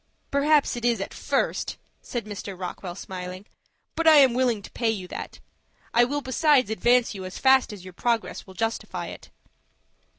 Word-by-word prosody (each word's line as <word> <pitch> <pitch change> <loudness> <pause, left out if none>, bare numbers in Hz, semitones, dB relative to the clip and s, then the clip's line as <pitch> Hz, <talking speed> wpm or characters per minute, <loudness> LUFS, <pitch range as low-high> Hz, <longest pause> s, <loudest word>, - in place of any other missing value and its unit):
"Perhaps 285 0 +3
it 240 - -6
is 240 -3 +2
at 195 - -5
first," - - -1 0.2
said 240 -4 -5
Mr. 200 -2 -7
Rockwell, 180 -1 -6
smiling; 185 0 -7 0.5
"but 330 0 0
I 315 - +9
am 265 -4 +7
willing 240 -4 +1
to - - -11
pay 230 -2 0
you 195 -5 -3
that. - - -7 0.5
I 240 +1 +5
will 290 +3 -2
besides 260 -3 +3
advance 240 +2 +3
you 195 -2 -7
as 185 0 -7
fast 265 -2 +4
as 200 -4 -9
your 185 -1 -10
progress 230 +2 -1
will 190 - -13
justify 225 +4 -3
it." - - -11
230 Hz, 175 wpm, -25 LUFS, 190-260 Hz, 0.5 s, I